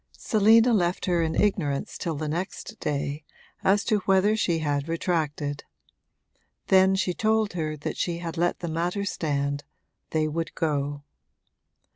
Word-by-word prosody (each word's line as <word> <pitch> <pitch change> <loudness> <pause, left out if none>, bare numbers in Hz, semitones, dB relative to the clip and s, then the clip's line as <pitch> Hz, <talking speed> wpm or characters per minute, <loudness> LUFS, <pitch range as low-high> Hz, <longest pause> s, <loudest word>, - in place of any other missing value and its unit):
Selina 225 +2 +4
left 180 -3 +1
her 175 -2 +2
in 160 0 -1
ignorance 155 -9 0
till 165 -3 -3
the 155 +1 -3
next 170 +5 -4
day 145 0 -2 0.4
as 200 +1 +3
to 215 -3 +2
whether 195 +2 +4
she 175 -6 +1
had 145 -2 -1
retracted; 155 -4 -1 1.1
then 190 0 +5
she 190 -2 0
told 220 0 +1
her 155 -3 -3
that 145 - -5
she 170 -1 -1
had 170 -1 -5
let 175 +1 0
the 170 - -3
matter 175 +5 -1
stand 145 -5 -1 0.5
they 155 -1 +1
would 165 +2 -3
go. 145 -2 -1
165 Hz, 145 wpm, -26 LUFS, 150-190 Hz, 1.1 s, then